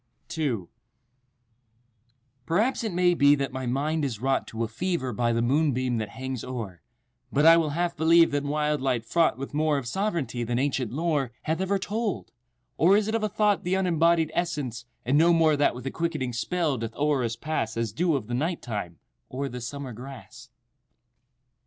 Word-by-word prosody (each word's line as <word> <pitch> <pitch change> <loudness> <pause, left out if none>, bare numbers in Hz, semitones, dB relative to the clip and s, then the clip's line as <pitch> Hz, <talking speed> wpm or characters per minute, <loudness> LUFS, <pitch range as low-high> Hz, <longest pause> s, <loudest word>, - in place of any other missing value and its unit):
II 130 - -1 1.8
Perhaps 220 +10 +1
it 220 - -2
may 180 0 +3
be 145 -3 +5
that 140 -2 -3
my 130 -1 -4
mind 150 +5 0
is 125 -7 -2
wrought 135 +3 0
To 115 +1 -3
a - - -1
fever* 130 +1 -2
by 120 +2 +1
the 115 0 +1
moonbeam 130 -3 +1
that 110 -2 -3
hangs 130 0 -5
o'er, 110 -9 -6 0.5
But 145 +2 +2
I 165 0 +9
will 160 -2 +1
half 175 0 0
believe 165 +1 +5
that 145 0 0
wild 150 0 0
light 125 -4 0
fraught 165 +4 +2
With 135 +1 -6
more 150 0 +2
of 135 - -4
sovereignty 170 - -2
than 120 +1 -1
ancient 130 -3 -1
lore 145 -3 0
Hath 160 +3 -1
ever 195 +1 +1
told—or 180 - -1
is 210 -1 0
it 220 - -2
of 225 - +1
a 215 - 0
thought 210 -1 +1
The 180 +2 0
unembodied 170 -3 +2
essence, 145 -10 -2 0.2
and 135 +5 +3
no 170 +2 +5
more 160 -2 +4
That 145 -3 +2
with 125 +1 -8
a 135 - -2
quickening 155 -7 -2
spell 150 +2 -1
doth 115 0 -5
o'er 145 -3 +1
us 115 -1 -2
pass 115 -6 -3
As 115 -2 -1
dew 165 - +1
of 130 -6 -2
the 120 - -6
night 160 +7 -1
time, 100 -8 -5 0.3
o'er 135 +2 -3
the 125 -1 -7
summer 130 +1 -6
grass? 130 +1 -11
140 Hz, 190 wpm, -26 LUFS, 125-165 Hz, 1.8 s, I